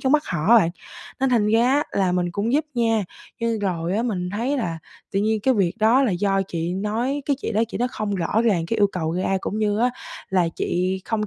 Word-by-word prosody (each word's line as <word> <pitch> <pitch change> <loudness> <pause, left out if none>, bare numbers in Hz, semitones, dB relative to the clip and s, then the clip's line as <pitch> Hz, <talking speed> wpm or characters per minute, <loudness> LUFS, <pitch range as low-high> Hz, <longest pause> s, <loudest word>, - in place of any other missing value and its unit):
trong 265 - +1
mắt 300 0 +4
họ 155 -3 -2
á 235 - +8
bạn, 170 -7 +4 0.5
nên 270 - +3
thành 225 -4 +3
ra 225 +2 +4
á 290 +2 +2
là 190 -2 +1
mình 175 -1 0
cũng 210 +5 -1
giúp 300 +3 +2
nha, 225 -3 +1 0.4
nhưng 230 -1 0
rồi 180 -2 -1
á 225 - +1
mình 185 -7 -2
thấy 235 +8 -1
là 170 -10 -2 0.3
tự 195 - +1
nhiên 215 +1 +1
cái 260 +5 +2
việc 190 -6 +1
đó 230 +5 +4
là 255 - +2
do 195 +2 +1
chị 170 -1 -3
nói, 230 +8 -1
cái 280 - +1
chị - - -3
đó 220 +1 +2
chị - - -5
nói 245 - +1
không 210 -3 -3
rõ 195 +5 0
ràng 190 -8 +2
cái 230 - -1
yêu 205 - +5
cầu 160 -3 -2
ra, 190 +2 0
cũng 210 - -3
như 210 -1 +1
á 245 +2 +3 0.4
là 180 -3 +2
chị 185 +2 -1
không 215 -1 -1
210 Hz, 250 wpm, -23 LUFS, 185-230 Hz, 0.5 s, á